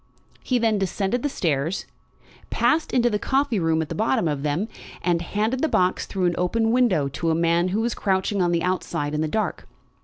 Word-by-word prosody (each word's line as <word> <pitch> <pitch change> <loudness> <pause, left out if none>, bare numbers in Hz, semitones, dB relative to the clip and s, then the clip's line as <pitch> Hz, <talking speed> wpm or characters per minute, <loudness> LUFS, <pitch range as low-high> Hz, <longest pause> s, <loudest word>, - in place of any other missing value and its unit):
He 255 - +1
then 225 -3 +2
descended 195 +5 -1
the 290 - 0
stairs, 160 - -1 0.6
passed 315 +1 +1
into 245 -1 +3
the 210 -3 0
coffee 265 -2 +1
room 160 -1 +1
at 155 - -10
the - - -3
bottom 220 -2 +1
of 145 -3 -2
them, 150 +8 -1 0.4
and 175 -2 +1
handed 215 +8 -1
the 320 - +2
box 180 0 +1
through 190 -2 -1
an 175 -1 +1
open 225 +5 +1
window 225 - +3
to 165 +5 -2
a 160 - +2
man 170 +1 +2
who 200 +4 0
was 235 0 0
crouching 190 0 0
on 175 -1 +2
the 170 -1 +1
outside 170 -5 -2
in 150 - 0
the 155 - 0
dark. 215 +7 -2
185 Hz, 210 wpm, -24 LUFS, 165-225 Hz, 0.6 s, into